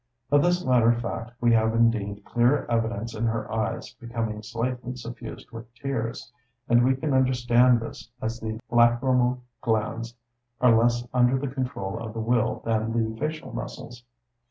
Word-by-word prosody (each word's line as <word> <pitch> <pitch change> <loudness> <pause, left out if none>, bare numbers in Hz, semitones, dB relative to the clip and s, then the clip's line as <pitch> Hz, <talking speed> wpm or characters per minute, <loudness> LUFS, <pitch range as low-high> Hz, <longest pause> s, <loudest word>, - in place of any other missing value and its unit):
Of 145 0 +6
this 175 +2 +1
latter 120 -2 +5
fact 120 0 -5
we 120 -1 +3
have 110 0 +3
indeed 105 -3 +1
clear 120 +4 +2
evidence 115 -1 -1
in 115 +1 -2
her 110 -1 -2
eyes 110 -1 -2
becoming 115 -3 -4
slightly 125 +3 -3
suffused 120 -1 -9
with 115 0 -10
tears; 125 -3 -4 0.3
and 120 +1 +5
we 130 +1 +3
can 140 +2 -2
understand 125 -2 +4
this, 115 - -8
as 115 +1 -3
the 110 -1 -4
lacrymal 125 +1 +3 0.2
glands 115 0 -1 0.4
are 125 -2 +5
less 120 +1 +2
under 125 +1 +4
the 130 -1 -4
control 125 -8 -3
of 110 -2 -6
the 115 - -5
will 115 0 0
than 115 0 0
the 110 -1 0
facial 155 +1 -4
muscles. 120 0 -7
120 Hz, 155 wpm, -26 LUFS, 115-125 Hz, 0.4 s, Of